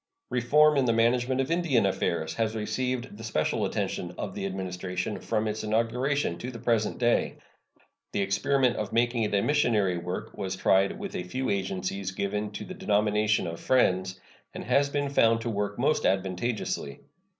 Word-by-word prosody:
Reform 150 Hz, +5 st, +4 dB
in 135 Hz, -, +3 dB
the 115 Hz, -, +3 dB
management 125 Hz, +3 st, +2 dB
of 135 Hz, -, -3 dB
Indian 160 Hz, -, +2 dB
affairs 85 Hz, -4 st, -1 dB
has 110 Hz, -1 st, -1 dB
received 125 Hz, +1 st, -2 dB
the 110 Hz, -, -9 dB
special 95 Hz, -9 st, 0 dB
attention 90 Hz, 0 st, -3 dB
of 100 Hz, -2 st, -4 dB
the 100 Hz, -1 st, -3 dB
Administration 90 Hz, +1 st, -4 dB
from 110 Hz, -1 st, -1 dB
its 110 Hz, +1 st, -3 dB
inauguration 115 Hz, 0 st, 0 dB
to 125 Hz, -, -5 dB
the 120 Hz, -, -7 dB
present 115 Hz, -2 st, 0 dB
day. 120 Hz, -1 st, +1 dB, 0.8 s
The 100 Hz, -, 0 dB
experiment 125 Hz, +6 st, +1 dB
of 105 Hz, -, -3 dB
making 120 Hz, +1 st, +1 dB
it 105 Hz, -2 st, 0 dB
a 100 Hz, -, +2 dB
missionary 110 Hz, -11 st, +2 dB
work 90 Hz, +1 st, -5 dB
was 95 Hz, -2 st, -3 dB
tried 95 Hz, +1 st, +2 dB
with -, -, -6 dB
a -, -, -2 dB
few 130 Hz, +9 st, -2 dB
agencies 95 Hz, 0 st, -2 dB
given 105 Hz, +2 st, -2 dB
to -, -, -6 dB
the 185 Hz, -, -7 dB
denomination 105 Hz, -, +1 dB
of 85 Hz, 0 st, -5 dB
Friends, 95 Hz, -7 st, +2 dB, 0.4 s
and -, -, -5 dB
has 140 Hz, 0 st, +2 dB
been 145 Hz, 0 st, -1 dB
found 115 Hz, -4 st, +4 dB
to 115 Hz, 0 st, -2 dB
work 105 Hz, 0 st, -2 dB
most 145 Hz, +5 st, +1 dB
advantageously. 95 Hz, -, -1 dB
110 Hz, 170 wpm, -28 LUFS, 95-125 Hz, 0.8 s, Reform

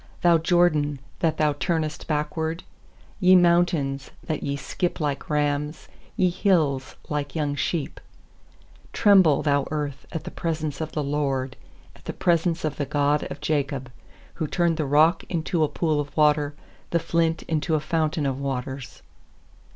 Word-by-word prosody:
Thou 170 Hz, -2 st, +5 dB
Jordan, 160 Hz, -4 st, +2 dB, 0.2 s
that 165 Hz, -2 st, +1 dB
thou 150 Hz, -1 st, +2 dB
turnest 155 Hz, 0 st, -2 dB
backward? 160 Hz, +2 st, -2 dB, 0.6 s
6Ye 185 Hz, 0 st, +7 dB
mountains, 170 Hz, -6 st, +2 dB
that 155 Hz, -2 st, -3 dB
ye 140 Hz, -, -2 dB
skip 175 Hz, +5 st, -3 dB
like 145 Hz, -3 st, -2 dB
rams, 150 Hz, +1 st, -1 dB, 0.3 s
Ye 185 Hz, -1 st, +3 dB
hills, 160 Hz, -9 st, +1 dB
like 145 Hz, -2 st, -3 dB
young 150 Hz, -3 st, 0 dB
sheep? 150 Hz, +1 st, -2 dB, 0.9 s
7Tremble, 190 Hz, -8 st, +5 dB
thou 140 Hz, -2 st, +1 dB
earth, 145 Hz, -3 st, -4 dB
at 165 Hz, -, -4 dB
the -, -, -7 dB
pres 165 Hz, -2 st, -3 dB
ence 150 Hz, -1 st, -3 dB
of 160 Hz, 0 st, -4 dB
the 150 Hz, -, -1 dB
Lord, 135 Hz, -2 st, -1 dB, 0.4 s
At -, -, -20 dB
the -, -, -4 dB
presence 170 Hz, -1 st, +1 dB
of 150 Hz, -2 st, -2 dB
the 145 Hz, -, -2 dB
God 145 Hz, +1 st, +1 dB
of -, -, -8 dB
Jacob; 140 Hz, -4 st, -1 dB, 0.5 s
8Who 155 Hz, -, -2 dB
turned 170 Hz, -2 st, +1 dB
the 155 Hz, -, 0 dB
rock 155 Hz, +5 st, +4 dB
into 165 Hz, -1 st, 0 dB
a -, -, +3 dB
pool 155 Hz, -1 st, 0 dB
of 145 Hz, +1 st, -5 dB
water, 150 Hz, -1 st, +3 dB, 0.3 s
The 170 Hz, -, +2 dB
flint 165 Hz, 0 st, 0 dB
into 160 Hz, 0 st, 0 dB
a -, -, +2 dB
fountain 155 Hz, 0 st, -1 dB
of 135 Hz, -1 st, -1 dB
waters. 135 Hz, -1 st, -5 dB
150 Hz, 160 wpm, -25 LUFS, 145-165 Hz, 0.9 s, 6Ye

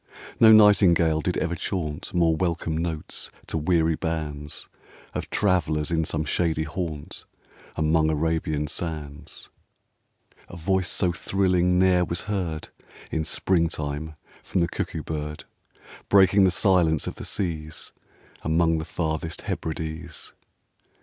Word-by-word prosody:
No 110 Hz, -1 st, +8 dB
Nightingale 90 Hz, -7 st, +6 dB
did 90 Hz, -, -1 dB
ever 85 Hz, -1 st, -1 dB
chaunt 80 Hz, -3 st, -3 dB
More 85 Hz, -2 st, +3 dB
welcome 85 Hz, -2 st, -1 dB
notes 80 Hz, -1 st, -3 dB, 0.2 s
to -, -, -6 dB
weary 80 Hz, 0 st, +2 dB
bands 75 Hz, -3 st, -4 dB, 0.5 s
Of -, -, -4 dB
travellers 80 Hz, -6 st, +1 dB
in 80 Hz, -1 st, +1 dB
some 75 Hz, 0 st, -2 dB
shady 80 Hz, 0 st, 0 dB
haunt, 80 Hz, -2 st, -5 dB, 0.5 s
Among 80 Hz, 0 st, +2 dB
Arabian 80 Hz, -1 st, 0 dB
sands: 75 Hz, -1 st, -5 dB, 1.0 s
A 90 Hz, -, -9 dB
voice 95 Hz, +2 st, 0 dB
so 90 Hz, -3 st, +1 dB
thrilling 90 Hz, -1 st, +1 dB
ne'er 90 Hz, -1 st, +4 dB
was 85 Hz, 0 st, -2 dB
heard 90 Hz, -7 st, -3 dB, 0.4 s
In 80 Hz, -, 0 dB
spring 85 Hz, +1 st, +1 dB
time 75 Hz, +1 st, -4 dB, 0.3 s
from 90 Hz, -, -1 dB
the 85 Hz, -, +2 dB
Cuckoo 80 Hz, -, -4 dB
bird, 75 Hz, -1 st, -5 dB, 0.7 s
Breaking 100 Hz, 0 st, +6 dB
the -, -, +5 dB
silence 90 Hz, -5 st, +3 dB
of -, -, -5 dB
the -, -, -7 dB
seas 80 Hz, -5 st, -3 dB, 0.5 s
Among 80 Hz, 0 st, +2 dB
the 80 Hz, -, -4 dB
farthest 80 Hz, -1 st, -3 dB
Hebrides. 80 Hz, +1 st, -5 dB
80 Hz, 125 wpm, -25 LUFS, 80-90 Hz, 1.0 s, No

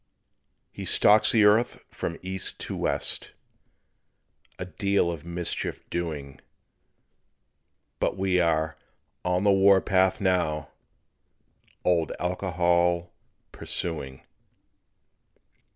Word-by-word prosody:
He -, -, -8 dB
stalks 105 Hz, +1 st, +4 dB
the 110 Hz, -2 st, +4 dB
earth 110 Hz, +4 st, +3 dB
from 85 Hz, -, -4 dB
east 95 Hz, 0 st, -1 dB
to -, -, -4 dB
west, -, -, -1 dB, 1.2 s
A 90 Hz, -, -5 dB
deal 100 Hz, -1 st, 0 dB
of 80 Hz, -4 st, -7 dB
mischief 85 Hz, 0 st, -4 dB
doing; 75 Hz, -6 st, -5 dB, 1.6 s
But -, -, -1 dB
we 95 Hz, -1 st, +1 dB
are 80 Hz, -2 st, 0 dB, 0.5 s
"on 90 Hz, +1 st, 0 dB
the 100 Hz, -, +4 dB
war 95 Hz, 0 st, +5 dB
path" 95 Hz, 0 st, +2 dB
now, 90 Hz, -6 st, 0 dB, 1.2 s
Old 85 Hz, -3 st, +1 dB
Alcohol 90 Hz, -1 st, 0 dB, 0.4 s
pursuing. 70 Hz, -6 st, -3 dB
90 Hz, 90 wpm, -26 LUFS, 85-95 Hz, 1.6 s, war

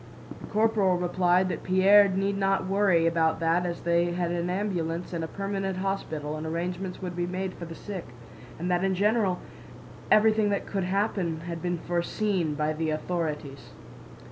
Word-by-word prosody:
The -, -, -10 dB
corporal 210 Hz, -4 st, +2 dB
replied 180 Hz, +1 st, +2 dB
that -, -, -3 dB
Pierre 195 Hz, +2 st, +6 dB
need 195 Hz, +1 st, 0 dB
not 195 Hz, -1 st, +1 dB
worry 190 Hz, -3 st, +3 dB
about 165 Hz, -1 st, +2 dB
that 170 Hz, +2 st, +2 dB
as 170 Hz, -1 st, -4 dB
they 170 Hz, 0 st, +1 dB
had 175 Hz, -1 st, -1 dB
an 175 Hz, 0 st, -1 dB
ambulance 180 Hz, -3 st, -2 dB
and 165 Hz, -1 st, -2 dB
a -, -, -3 dB
permanent 195 Hz, 0 st, -3 dB
hospital 160 Hz, -6 st, -3 dB
and 155 Hz, +1 st, -5 dB
arrangements 180 Hz, +3 st, -4 dB
would 180 Hz, -1 st, -4 dB
be 175 Hz, 0 st, -1 dB
made 185 Hz, +1 st, -3 dB
for 170 Hz, -, -8 dB
the 165 Hz, 0 st, -8 dB
sick, 195 Hz, -1 st, -7 dB, 0.5 s
and 180 Hz, +3 st, -2 dB
that 175 Hz, +1 st, +1 dB
in 190 Hz, -1 st, +1 dB
general 205 Hz, -1 st, +2 dB, 0.7 s
everything 215 Hz, -1 st, +4 dB
that 200 Hz, -, -1 dB
could 195 Hz, -3 st, -2 dB
happen 185 Hz, -4 st, -1 dB
had 170 Hz, -1 st, -6 dB
been 175 Hz, -1 st, -1 dB
foreseen 175 Hz, -1 st, -1 dB
by 150 Hz, +1 st, 0 dB
the 160 Hz, +1 st, -2 dB
authorities. 155 Hz, -3 st, -3 dB
180 Hz, 170 wpm, -27 LUFS, 170-195 Hz, 0.7 s, Pierre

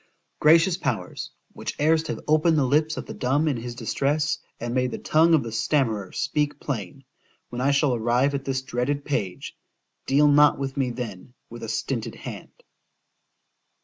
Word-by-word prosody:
——Gracious 165 Hz, +3 st, +5 dB
powers! -, -, -3 dB, 0.2 s
which -, -, -5 dB
erst 160 Hz, +2 st, +2 dB
have 155 Hz, -, -3 dB
opened 155 Hz, +1 st, +3 dB
the 140 Hz, -, +3 dB
lips 155 Hz, +4 st, +1 dB
of -, -, -5 dB
the -, -, -7 dB
dumb 140 Hz, +5 st, +1 dB
in 145 Hz, -, +1 dB
his 120 Hz, +1 st, -6 dB
distress, 140 Hz, +5 st, 0 dB, 0.2 s
and 120 Hz, 0 st, -4 dB
made 125 Hz, 0 st, +1 dB
the -, -, -5 dB
tongue 165 Hz, +2 st, +4 dB
of 150 Hz, -, +1 dB
the 115 Hz, -, -6 dB
stammerer 110 Hz, -4 st, 0 dB
speak 150 Hz, -2 st, -1 dB
plain—when 125 Hz, +1 st, -7 dB
I 135 Hz, -, +2 dB
shall 140 Hz, -1 st, +3 dB
arrive 120 Hz, +4 st, +1 dB
at 140 Hz, -1 st, -2 dB
this 130 Hz, -1 st, -2 dB
dreaded 135 Hz, +3 st, -2 dB
page, 100 Hz, -10 st, -3 dB, 0.5 s
deal 145 Hz, +2 st, +4 dB
not 145 Hz, 0 st, +5 dB
with 135 Hz, -1 st, -4 dB
me, 135 Hz, -3 st, 0 dB
then, 120 Hz, -1 st, -7 dB, 0.2 s
with 120 Hz, 0 st, -9 dB
a 115 Hz, -, -5 dB
stinted 115 Hz, +2 st, -3 dB
hand. -, -, -10 dB
135 Hz, 170 wpm, -25 LUFS, 120-150 Hz, 0.5 s, Gracious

